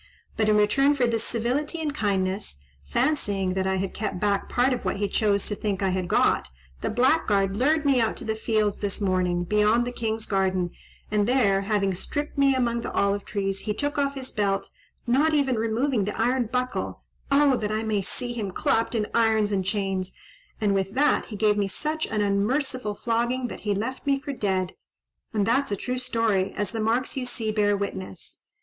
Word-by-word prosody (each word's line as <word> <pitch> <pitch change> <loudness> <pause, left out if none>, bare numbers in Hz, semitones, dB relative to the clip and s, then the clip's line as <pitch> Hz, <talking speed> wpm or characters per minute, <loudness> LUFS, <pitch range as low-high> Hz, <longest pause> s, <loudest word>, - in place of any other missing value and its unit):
But 215 -1 +1
in 210 - +4
return 275 +8 +4
for 260 -3 +2
this 230 -1 0
civility 255 +9 -1
and 305 -2 -2
kindness, 190 - -1 0.2
fancying 200 - 0
that 190 0 -1
I 190 - +1
had 190 0 -2
kept 210 -4 -3
back 200 0 0
part 250 +2 +2
of 250 - -4
what - - -1
he 205 0 0
chose 200 -1 +1
to - - -2
think 205 -1 -2
I 190 - +2
had 185 -1 -1
got, - - +2 0.3
the - - -1
blackguard 215 -6 +2
lured 295 +6 +2
me 270 -3 +4
out 225 - 0
to - - -8
the 220 - 0
fields 215 -2 0
this 200 -2 -2
morning, 185 -3 +1
beyond 210 +5 +3
the 245 - -3
king's 225 -2 -2
garden, 185 -3 0 0.4
and 210 -1 +2
there, 215 -7 +3
having 200 -1 +1
stripped 290 +11 -4
me 275 -1 +4
among 235 -2 0
the - - -5
olive 200 0 +1
trees, 195 -1 -2
he 210 +1 -3
took 290 +3 -2
off 280 0 0
his 260 -1 -6
belt, 200 -2 -1 0.3
not 290 +6 +3
even 270 -4 +2
removing 225 +1 0
the 210 - -4
iron 245 +1 +2
buckle—oh 260 +2 0
that 210 -2 -2
I 215 +1 -1
may 215 -2 0
see 240 +5 -3
him 215 -4 -3
clapped 225 +5 0
in 215 -2 +1
irons 220 -2 +3
and 195 -2 +1
chains!—and 195 - -3
with 195 +1 -1
that 295 +2 +3
he 215 - -8
gave 210 0 +2
me 200 -1 +1
such 305 +10 -2
an 215 -1 -1
unmerciful 210 +3 0
flogging, 240 +3 -1
that - - -7
he 205 -1 -1
left 255 +7 -4
me 275 -1 +3
for 280 +1 -5
dead; 190 -6 -1 0.6
and 210 -3 +1
that's 260 +4 +1
a - - +1
true 250 +5 -3
story, 225 -6 0
as 205 -2 -2
the 225 - -4
marks 230 +4 0
you 255 -2 -2
see 225 -3 -2
bear 205 -1 +2
witness." 195 -2 -6
215 Hz, 200 wpm, -25 LUFS, 200-255 Hz, 0.6 s, in